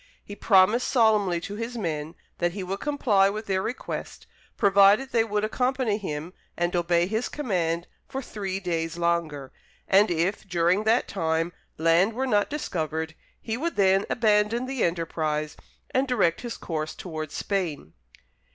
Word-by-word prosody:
He 205 - -9
promised 205 +4 +4
solemnly 215 -7 +3
to 205 +4 -6
his 235 +2 -4
men 160 -5 -3 0.2
that 175 -1 0
he 195 -1 -4
would 195 +2 -4
comply 230 -10 +2
with 215 +2 -5
their 190 -2 0
request, 240 +6 -5 0.3
provided 200 +6 +5
they 230 -2 +3
would 210 -2 -1
accompany 250 -1 0
him 160 -2 -5 0.2
and 175 +1 0
obey 175 0 +2
his 220 +5 -2
command 175 - -1 0.2
for 265 - -4
three 195 -6 -4
days 165 -3 -2
longer, 170 -5 -1 0.4
and 195 +2 +5
if, 175 +4 0
during 175 +4 +2
that 230 +3 +3
time, 165 -2 -1 0.2
land 165 +6 +3
were 260 +4 -1
not 205 -5 +2
discovered, 160 - -3 0.3
he 225 0 -3
would 335 +5 -2
then 195 0 +3
abandon 220 +1 +2
the 265 -2 -2
enterprise, 155 -3 -1 0.4
and 265 +1 +1
direct 205 -10 +1
his 240 -2 -5
course 155 -2 -4
towards 155 -4 -6
Spain. 175 - -3
195 Hz, 150 wpm, -26 LUFS, 170-220 Hz, 0.4 s, provided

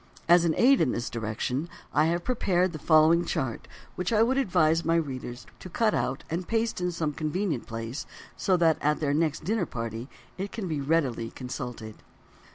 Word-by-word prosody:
As 175 0 +6
an 160 - +2
aid 265 +2 +5
in 145 -6 +2
this 120 - -3
direction 120 +7 -3 0.2
I 150 - +4
have 170 +1 0
prepared 185 -7 +1
the 155 - -6
following 160 +2 +5
chart 130 -8 -3 0.3
which 180 +2 -2
I 220 -1 +5
would 250 +3 +2
advise 165 -8 +3
all 165 - -7
my 165 - +3
readers 130 -6 -3
to 185 - -9
cut 215 +4 +1
out 135 +2 -1
and 170 +2 -3
paste 225 -3 0
in 180 0 0
some 160 -3 -2
convenient 155 - -2
place 115 +3 -5 0.3
so 190 -3 +2
that 165 -2 +3
at 150 +1 +1
their 145 -2 0
next 155 0 0
dinner 215 +6 0
party 115 +2 -5 0.3
it 195 +1 -3
can 215 -5 -4
be 155 -4 -2
readily 135 -6 0
consulted. 125 -4 -6
160 Hz, 190 wpm, -27 LUFS, 130-180 Hz, 0.3 s, As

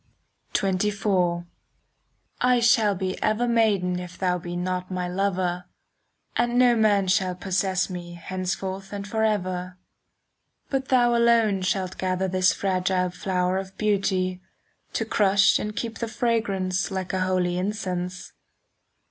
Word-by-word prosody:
XXIV 190 -3 +1 1.0
I 250 0 +4
shall 230 -3 +4
be 185 0 -3
ever 215 +3 +1
maiden, 205 -6 +2
If 180 0 -8
thou 180 -1 0
be 175 0 -6
not 180 +1 -2
my 180 -1 -2
lover, 180 -1 -1 0.7
And 240 0 +1
no 245 -1 +5
man 205 -3 +3
shall 185 -1 +1
possess 185 0 0
me 175 -2 -7
Henceforth 185 +2 -4
and 200 0 -5
forever. 185 -4 -1 0.9
But 265 -1 -1
thou 240 -2 +4
alone 230 -4 +3
shalt 185 0 -2
gather 185 0 0
5 185 - -3
This 185 -1 +4
fragile 185 0 0
flower 180 0 -1
of 190 0 -9
beauty,— 190 -3 0 0.5
To - - -1
crush 195 -1 +4
and 210 0 -4
keep 225 +1 -4
the 230 - -2
fragrance 200 -6 0
Like 190 -1 -4
a 190 - 0
holy 180 -1 0
incense. 185 -2 -4
190 Hz, 130 wpm, -25 LUFS, 180-210 Hz, 1.0 s, no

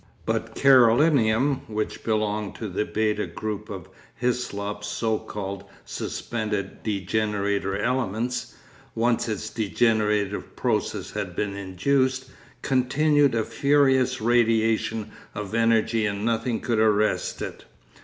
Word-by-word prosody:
But - - -2
Carolinum, 130 0 +4
which 110 0 -3
belonged 105 -2 -1
to 110 - -5
the 100 +2 -2
β 105 -1 -1
Group 105 -1 -4
of 95 -5 -7 0.3
Hyslop's 105 -4 -2
so 110 0 -1
called 100 -1 -6 0.2
'suspended 110 -4 -4
degenerator' 100 -1 -1
elements, 120 0 -1 0.4
once 115 0 +1
its 110 0 -4
degenerative 105 -1 0
process - - -1
had - - -4
been 100 -1 -2
induced, 130 +7 0 0.3
continued 140 +1 +3
a 110 - +1
furious 135 -2 +2
radiation 115 -1 +2 0.2
of 105 -1 -5
energy 115 -1 +2
and 100 +1 -3
nothing 115 0 0
could 115 -3 0
arrest 110 -1 +1
it. - - -7
110 Hz, 110 wpm, -25 LUFS, 105-125 Hz, 0.4 s, Carolinum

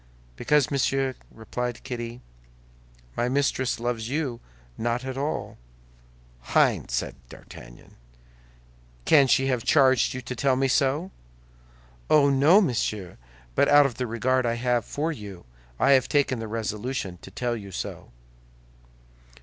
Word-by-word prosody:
"Because, 150 - +2
monsieur," 135 -1 0 0.2
replied 120 +2 -5
Kitty, 120 0 -6 0.9
"my 120 - 0
mistress 130 -2 0
loves 115 -1 -3
you 135 -5 -2 0.4
not 120 +2 -2
at 130 -1 -4
all." 140 +3 -4 1.0
"Hein!" - - +3
said - - -2 0.2
D'Artagnan, - - -14 1.1
"can 140 -3 +6
she 135 +1 +3
have 125 -4 0
charged 130 -4 +3
you 130 - -4
to 125 - -6
tell 130 +2 +2
me 135 +1 +1
so?" 145 +7 +1 1.0
"Oh, 140 -2 +5
no, 150 +9 +5
monsieur; 110 - -2 0.3
but - - +3
out 145 0 +7
of 130 -4 -2
the 125 - -2
regard 130 +3 0
I 115 -1 0
have 120 -1 0
for 155 +3 -2
you, 100 - -9 0.3
I - - +4
have 130 -2 +4
taken 140 -4 +1
the 115 - -5
resolution 110 -3 -4
to - - -11
tell 120 -1 -2
you 100 -3 -8
so." 85 - -6
125 Hz, 135 wpm, -25 LUFS, 115-135 Hz, 1.1 s, out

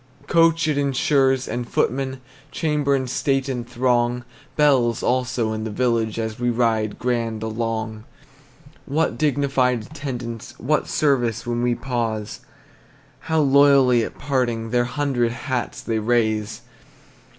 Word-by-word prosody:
Coach 165 -1 +3
it 150 -2 +1
insures, 135 -1 +2
and 120 -1 -4
footmen, 130 +1 -1 0.3
Chamber 150 -3 +1
and 130 -1 -2
state 135 +2 0
and 120 -3 -4
throng; 120 0 +1 0.3
Bells, 130 -6 +3
also, 125 -3 0
in 110 0 -4
the 110 - -3
village, 115 -1 0
As 110 -1 -3
we 120 0 +1
ride 115 -3 0
grand 115 -3 -2
along. 110 -1 -3 0.8
What 155 +4 0
dignified 135 -5 +1
attendants, 120 -3 -6
What 150 +6 0
service 125 -7 +1
when 120 0 -1
we 120 0 +1
pause! 115 -4 -3 0.9
How 160 -1 +3
loyally 135 -4 +5
at - - -6
parting 120 -5 -1
Their 120 0 +2
hundred 125 -3 0
hats 130 0 -3
they 115 -1 -1
raise! 110 -2 0
125 Hz, 130 wpm, -22 LUFS, 115-135 Hz, 0.9 s, loyally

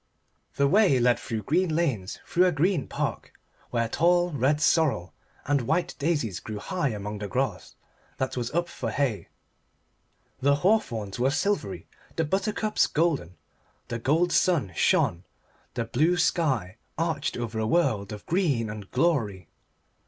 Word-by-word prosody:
The 140 - +3
way 195 -4 +4
led 120 0 +3
through 110 -2 -4
green 170 0 +1
lanes 125 - -1
through 180 +2 +3
a - - +3
green 165 0 +1
park, - - -4 0.4
where 115 -1 0
tall 175 +7 +2
red 145 +1 +1
sorrel 145 - +2 0.3
and 145 0 +2
white 160 +9 0
daisies 140 - 0
grew 110 -1 -6
high 175 - -2
among 105 -1 -5
the 105 - -4
grass 90 - -2 0.4
that 130 - -2
was 120 -2 -2
up 170 +2 -1
for 120 -8 -5
hay. 110 -7 -1 1.1
The 140 +1 +3
hawthorns 125 - 0
were 130 +2 +3
silvery, 135 - -1 0.3
the 165 - 0
buttercups 210 +5 +1
golden. 150 - 0 0.5
The 115 - -3
gold 160 +8 +2
sun 160 - +2
shone, 85 +3 +2 0.5
the 120 -2 -1
blue 155 +10 +2
sky 135 - 0 0.2
arched 160 -3 -1
over 115 -2 -3
a 110 - 0
world 110 - +1
of 105 -1 -8
green 145 - 0
and 105 -2 -8
glory. 115 - 0
140 Hz, 145 wpm, -26 LUFS, 110-170 Hz, 1.1 s, way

